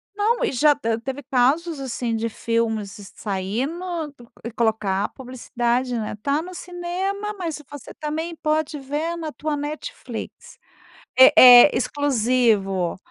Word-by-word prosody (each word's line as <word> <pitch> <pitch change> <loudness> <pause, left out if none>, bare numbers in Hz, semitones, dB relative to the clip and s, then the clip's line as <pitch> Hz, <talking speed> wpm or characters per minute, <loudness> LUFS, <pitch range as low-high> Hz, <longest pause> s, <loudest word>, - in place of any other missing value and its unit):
Não, 435 +3 +1
e - - +1
já, 295 +3 +4
te 230 -5 -2
teve 265 +3 -6
casos, 275 +5 +1
assim, 240 -3 -3
de 230 +1 -2
filmes 220 -4 -3
saindo, 270 - -3 0.4
e 235 - -5
colocar 215 -4 0
a - - -4
publicidade, 250 -1 -2
né, 215 -1 -4
tá 285 +4 0
no 365 +2 -9
cinema, 370 +4 -4
mas 330 -5 -4
você, 290 -4 -10
também, 320 +2 -4
pode 310 -1 -1
ver 295 +5 -3
na 315 -2 -5
tua 300 0 -3
Netflix, 300 +12 -7 0.6
é 260 - +9 0.3
é 295 - -3
exclusivo. 230 -9 +1
270 Hz, 135 wpm, -22 LUFS, 230-315 Hz, 0.6 s, é